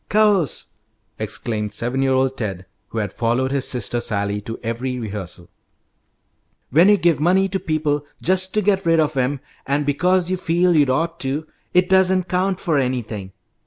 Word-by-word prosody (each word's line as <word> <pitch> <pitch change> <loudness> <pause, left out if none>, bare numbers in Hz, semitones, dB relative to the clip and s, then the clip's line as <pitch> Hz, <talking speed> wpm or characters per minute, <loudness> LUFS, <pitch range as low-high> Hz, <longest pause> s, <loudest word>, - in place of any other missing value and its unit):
"Course!" 205 - +2 0.5
exclaimed 105 -2 -3
seven 120 +5 -2
year 135 0 +2
old 130 0 +1
Ted, 95 -7 -4 0.2
who 115 - -8
had 105 -2 -2
followed 120 +3 0
his 140 -2 +1
sister 120 -1 0
Sally 100 -3 -1
to 115 +2 -6
every 125 +3 -3
rehearsal. 100 -6 -7 1.2
"When 165 +9 +6
you 205 - +6
give 170 -4 +2
money 185 +5 +3
to 190 +1 -2
people 150 -3 -1
just 185 +1 +2
to 215 - +2
get 195 -2 +1
rid 165 0 +4
of 155 -1 +1
'em, 130 +1 0 0.3
and 140 +2 0
because 180 +5 +1
you 185 - 0
feel 175 0 +2
you'd 145 -3 +4
ought 165 +6 0
to, 140 +2 -2 0.3
it 180 0 +4
doesn't 190 0 +3
count 185 +1 0
for 160 -6 +1
anything. 115 -7 -3
145 Hz, 170 wpm, -21 LUFS, 120-180 Hz, 1.2 s, When